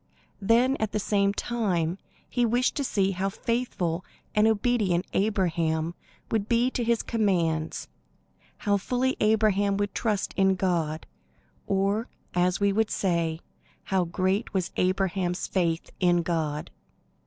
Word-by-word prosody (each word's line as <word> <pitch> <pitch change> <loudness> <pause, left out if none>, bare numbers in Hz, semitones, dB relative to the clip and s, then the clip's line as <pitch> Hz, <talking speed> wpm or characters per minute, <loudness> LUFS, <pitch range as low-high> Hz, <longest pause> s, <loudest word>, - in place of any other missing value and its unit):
Then 240 +6 +3
at 220 -1 -2
the 215 - +1
same 200 -1 +2
time 195 -6 -1 0.3
he 245 - 0
wished 240 +2 +2
to 285 - 0
see 195 -6 +1
how 195 +1 -1
faithful 190 -7 -2 0.3
and 210 +1 +4
obedient 210 -5 +1
Abraham 170 -5 0 0.4
would 220 -1 0
be 240 +2 +3
to 245 - -1
his 235 0 +1
commands; 170 -8 0 0.7
how 205 -1 +1
fully 255 +6 0
Abraham 210 -2 +3
would 205 -1 -1
trust 210 -4 -1
in 190 -1 +3
God, 165 -4 -1 0.6
or, 200 +4 +1 0.3
as 180 +1 +2
we 200 -1 +2
would 220 +1 +1
say, 170 -3 0 0.4
how 190 -2 +1
great 190 +5 -1
was 185 -1 0
Abraham's 185 -1 0
faith 170 -3 -1
in 175 -2 +3
God. 155 -3 -2
195 Hz, 130 wpm, -27 LUFS, 175-220 Hz, 0.7 s, and